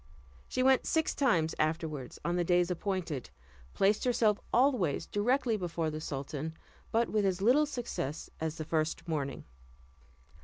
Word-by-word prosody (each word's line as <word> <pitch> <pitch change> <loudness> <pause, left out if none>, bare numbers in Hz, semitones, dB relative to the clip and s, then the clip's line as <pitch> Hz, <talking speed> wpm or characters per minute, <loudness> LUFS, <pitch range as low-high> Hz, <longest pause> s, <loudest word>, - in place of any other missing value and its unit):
She 255 - 0
went 265 0 +4
six 320 -1 +1
times 170 - +2
afterward 155 -4 -1
on 175 - +1
the 175 - +2
days 175 +1 +2
appointed, 180 - -3 0.5
placed 200 +2 +3
herself 225 -4 +3
always 240 - +2
directly 235 +2 +1
before 165 -4 -2
the 155 0 -5
sultan, 145 +2 -4 0.3
but 230 +1 +2
with 215 -1 +1
as 190 -2 +1
little 255 +9 +4
success 235 - -4
as 160 0 -2
the 155 - -4
first 160 +1 -1
morning. 145 -4 -2
175 Hz, 145 wpm, -31 LUFS, 155-230 Hz, 0.5 s, went